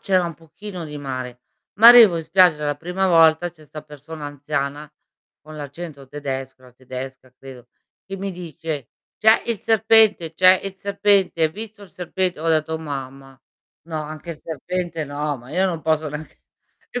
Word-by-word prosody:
c'era 185 -3 +2
un 170 - -4
pochino 175 +2 -9
di 150 -1 -8
mare. 130 -3 -6 0.3
Ma 220 +4 +8
arrivo 230 -7 +9
in 165 - -3
spiaggia 165 -2 +4
la 145 0 -1
prima 180 +5 -2
volta, 165 0 +4
c'è 160 -2 -21
'sta 155 +1 -10
persona 150 +1 -10
anziana 145 0 -4 0.5
con 155 +1 -12
l'accento 145 -1 -9
tedesco, 135 -2 -6
era 125 - -17
tedesca 130 +1 -9
credo, 130 -2 -12 0.4
che 195 - -6
mi 195 0 -4
dice: 160 -5 -6 0.3
"C'è 220 +1 +5
il 230 -3 -2
serpente, 220 -5 +3
c'è 185 +2 +5
il 195 - -4
serpente, 200 -3 +1
hai 155 - +3
visto 210 +3 -9
il 195 - -14
serpente?" 180 -1 -3
Ho 165 - -1
detto: 160 0 +1
"Oh 160 - -2
mamma. 135 -3 -8 0.4
No, 160 -1 -5
anche 155 +3 -8
il 160 - -8
serpente 165 +1 -4
no, 145 +1 -3
ma 125 +1 -14
io 185 +5 +1
non 170 -4 -3
posso 155 -1 0
neanche" 150 +2 -9 0.5
E 245 - -3
160 Hz, 175 wpm, -21 LUFS, 145-185 Hz, 0.5 s, arrivo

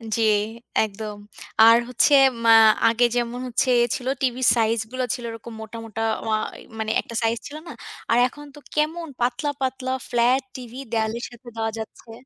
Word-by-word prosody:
জি, 230 - 0 0.6
একদম। 210 0 -6 0.4
আর 230 +1 +8
হচ্ছে 250 +4 +3 0.3
মা 230 - +7 0.4
আগে 230 +2 +3
যেমন 240 0 -1
হচ্ছে 250 +1 0
এ - - +4
ছিল, 255 -1 -6
টিভির 255 -1 0
সাইজ 225 0 +2
গুলো 255 0 -2
ছিল 245 - -6
এরকম 230 +1 -9
মোটা, 220 +1 -8
মোটা 225 0 -6 0.2
ওয়া 220 -1 +1 0.4
মানে 220 0 -1
একটা 230 - -10
সাইজ 225 +1 +1
ছিল 300 - -8
না? 330 - -7 0.4
আর 230 - +4
এখন 295 +3 -12
তো - - -11 0.2
কেমন 320 +3 0
পাতলা, 245 +4 0
পাতলা 260 0 -2 0.2
ফ্লাট 245 +2 +3
টিভি, 245 -1 -9
দেয়ালের 225 +1 -1
সাথে 240 +1 -17
দেওয়া 225 0 -1
যাচ্ছে। 220 +1 -9
240 Hz, 170 wpm, -23 LUFS, 225-255 Hz, 0.6 s, আর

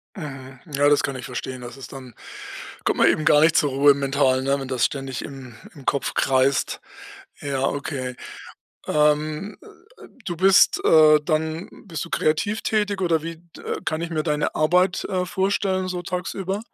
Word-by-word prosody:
Mhm. 135 -6 -8
Ja, 145 +1 +3
das 145 -1 +3
kann 140 -2 -2
ich 130 - -7
verstehen. 130 0 -6
Das 120 0 -9
ist 135 - -10
dann 130 -3 -10 0.7
kommt - - 0
man - - +6
eben 155 - +1
gar 150 0 +5
nicht 160 0 +4
zur 145 - +3
Ruhe, 140 +2 +5
mental, 135 -1 +1
ne, 140 +1 +1
wenn 135 - -6
das 125 -3 0
ständig 135 -2 -3
im 130 -4 -9 0.2
im 140 -4 -13
Kopf 140 - -1
kreist. 130 0 +1 0.6
Ja, 135 -2 -2
okay. 135 -3 -3 0.7
Ähm, 150 +5 +1
äh, - - -15 0.4
äh, - - -13 0.2
du 175 - -4
bist 190 +2 +5
äh, 155 -1 +6
dann 160 +2 -1 0.2
bist 165 -5 -4
du 165 - -12
kreativ 205 +8 0
tätig 205 -2 0
oder 165 -4 +1
wie 165 +1 -6
d 170 0 -17
äh, - - -3
kann 155 0 -2
ich 170 0 -4
mir 155 -2 -1
deine 150 -2 -1
Arbeit, 180 +4 +2
äh, 180 -1 -2
vorstellen, 190 0 0
so 180 -1 -4
tagsüber? 190 +2 -3
150 Hz, 185 wpm, -23 LUFS, 135-175 Hz, 0.7 s, man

